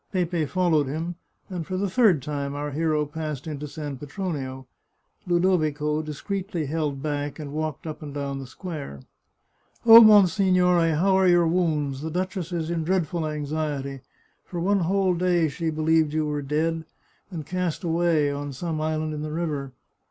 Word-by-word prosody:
Pepe 175 -4 0
followed 170 -5 +2
him, 160 +5 -3 0.3
and 180 -4 -4
for 185 - -2
the 200 +2 0
third 190 - +3
time 140 -1 -3
our 145 0 -3
hero 155 0 0
passed 150 -2 -5
into 150 -2 -5
San 145 -1 -6
Petronio. 140 -3 -5 0.6
Ludovico 155 -4 +1
discreetly 175 +3 -4
held 145 -2 -2
back, 145 -1 -2
and 145 -3 -7
walked 155 -1 -3
up 155 0 -6
and 150 -2 -7
down 140 -1 -4
the 135 - -7
square. 145 - -7 0.4
" - - -38
Oh, 230 0 +11
monsignore, 185 -4 +5
how 190 +5 +3
are 190 -1 +4
your 175 -1 +5
wounds? 155 -5 0
The 160 - -3
duchess 185 +1 -3
is 170 -1 -2
in 165 -2 -1
dreadful 170 -2 0
anxiety. 145 -2 -3 0.4
For 175 - -6
one 195 +3 +2
whole 190 +1 +2
day 175 -2 +2
she 160 +3 -3
believed 155 -1 +2
you 155 0 +1
were 150 -1 -2
dead, 160 +3 -1 0.5
and 165 -6 -6
cast 180 0 -2
away 165 -3 +2
on 140 0 -4
some 155 +3 -3
island 155 0 -1
in 150 - -4
the 155 0 -4
river. 150 -4 -3
155 Hz, 165 wpm, -25 LUFS, 145-175 Hz, 0.6 s, Oh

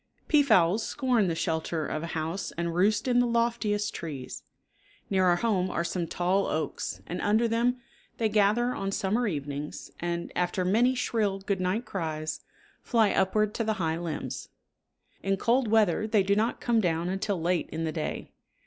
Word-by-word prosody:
Peafowls 220 - +4
scorn 245 -5 +1
the 165 - 0
shelter 160 -1 -1
of 155 - -3
a 165 - -4
house 165 +5 -3
and 170 0 -1
roost 205 +7 +2
in 245 -1 +3
the 245 - +3
loftiest 230 -3 0
trees. 145 -6 -6 0.7
Near 190 -1 +3
our 175 -1 +5
home 185 -2 +1
are 170 - -1
some 170 0 -2
tall 185 +4 +1
oaks 155 - -3
and 180 - -4
under 220 +3 +3
them 240 +2 +1 0.4
they 225 - +2
gather 215 +4 +2
on 195 0 -3
summer 215 +5 0
evenings, 145 -3 -5
and, 170 0 -3
after 180 +1 0
many 235 +7 +3
shrill 215 -5 0
good 195 -1 -2
night 190 +7 0
cries, 155 -4 -3 0.4
fly 225 -4 +3
upward 210 +2 +2
to 230 - -1
the 220 0 +1
high 165 -5 -1
limbs. 165 -3 -5 0.7
In 195 0 0
cold 240 +4 +2
weather 215 -2 +3
they 210 -2 +3
do 200 +1 +2
not 220 +3 0
come 235 -2 +2
down 170 -2 0
until 195 0 -1
late 175 +1 0
in 160 +1 -4
the 160 - -1
day. 155 -1 -4
195 Hz, 175 wpm, -28 LUFS, 170-225 Hz, 0.7 s, our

